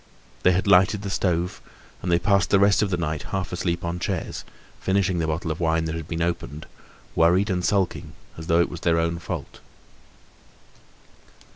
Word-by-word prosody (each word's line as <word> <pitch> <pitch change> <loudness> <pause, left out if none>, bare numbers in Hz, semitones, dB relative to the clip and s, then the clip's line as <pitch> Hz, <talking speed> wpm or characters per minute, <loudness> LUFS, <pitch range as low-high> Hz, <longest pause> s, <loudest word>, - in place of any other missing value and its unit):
They 90 - +5
had 95 - 0
lighted 100 +1 +4
the 100 - -4
stove, 90 -2 -1 0.4
and 90 - -2
they 85 - +5
passed 95 +1 +2
the 100 - +5
rest 100 +1 +4
of 105 - +1
the 90 - 0
night 80 -3 -2
half 95 0 -3
asleep 85 -1 -2
on 85 +1 -3
chairs, - - -3 0.4
finishing 95 -2 +1
the 80 - 0
bottle 80 +2 -2
of 80 - -4
wine 80 -1 +1
that 80 - -3
had 80 -1 -5
been 85 0 -2
opened, 75 -3 -3 0.5
worried 90 +5 +3
and 90 -1 -1
sulking, 95 0 0 0.2
as 80 0 -9
though 85 +1 +4
it - - +1
was 85 - -6
their 85 -1 +2
own 85 0 0
fault. 80 - -6
85 Hz, 185 wpm, -24 LUFS, 85-95 Hz, 0.5 s, They